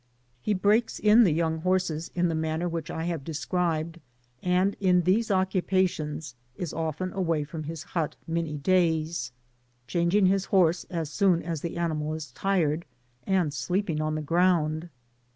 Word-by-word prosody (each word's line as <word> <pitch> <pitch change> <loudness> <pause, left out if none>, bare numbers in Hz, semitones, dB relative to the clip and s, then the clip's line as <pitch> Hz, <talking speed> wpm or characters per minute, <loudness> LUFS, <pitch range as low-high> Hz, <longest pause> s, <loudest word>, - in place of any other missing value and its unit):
He 210 - 0
breaks 210 +5 +2
in 220 +2 +6
the 180 - +3
young 160 0 0
horses 175 -2 0
in 175 0 +2
the 165 - -1
manner 160 +2 -1
which 165 -1 -4
I 160 -2 -3
have 170 -5 -2
described, 165 +1 -2 0.4
and 185 +2 +2
in 180 -2 +3
these 205 +6 +2
occu« 190 -1 +1
pations 160 -7 -1 0.2
is 175 0 -5
often 165 +3 -3
away 165 -5 0
from 155 +1 -7
his 160 0 -6
hut 165 -3 -2
many 165 -2 -2
days, 165 -3 +1 0.5
changing 170 +9 +2
his 195 +1 +2
horse 175 -3 +3
as 165 -4 -4
soon 185 -2 +2
as 165 -3 -3
the 170 0 -4
animal 155 -2 -1
is 155 -5 -7
tired, 170 -1 0 0.4
and 180 -6 +1
sleeping 165 - -1
on 155 0 -1
the 155 - -3
ground. 165 -1 +1
170 Hz, 160 wpm, -27 LUFS, 155-185 Hz, 0.5 s, in